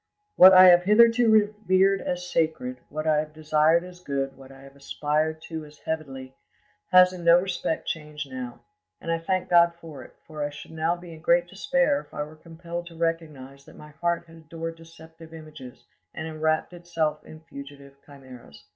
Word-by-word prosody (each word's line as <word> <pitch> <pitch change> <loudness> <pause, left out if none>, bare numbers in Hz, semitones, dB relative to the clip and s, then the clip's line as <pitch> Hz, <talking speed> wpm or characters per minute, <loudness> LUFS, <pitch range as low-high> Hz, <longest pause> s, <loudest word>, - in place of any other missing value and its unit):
"What 185 +1 +9
I 185 0 +9
have 175 0 +6
hitherto 230 +3 +5
revered 205 -3 +2
as 180 0 -4
sacred, 155 -7 -2
what 155 +1 -5
I 155 -1 +2
have 155 0 -5
desired 155 +2 +2
as 180 0 -12
good 135 -4 -4
what 135 0 -15
I 135 0 -15
have 135 0 -15
aspired 155 +3 -2
to 160 -2 -7
as 150 0 -15
heavenly, 135 -5 -6 0.6
has 185 0 +6
in 180 -1 -9
no 170 +1 +6
respect 180 -3 -3
changed 150 -2 -5
now. 125 -2 -7 0.4
And 165 - -5
I 165 - 0
thank 185 +2 -2
God 170 -1 +4
for 155 -6 -11
it, - - -17
for 155 -2 -8
I 145 - -2
should 145 - -12
now 160 +2 -1
be 175 -1 -12
in 160 - -13
great 175 +2 +3
despair 265 +9 0
if - - -15
I 150 - -2
were 155 +1 -12
compelled 170 +2 -8
to 170 - -13
recognise 155 -5 -4
that - - -16
my 150 - -13
heart 170 +2 -2
had 165 0 -16
adored 165 +1 -7
deceptive 165 0 -15
images 150 -6 -12 0.3
and 160 - -5
enwrapped 155 +2 -1
itself 165 -3 -3
in 155 - -13
fugitive 140 -3 -12
chimeras. 130 -6 -15
160 Hz, 190 wpm, -25 LUFS, 150-175 Hz, 0.6 s, What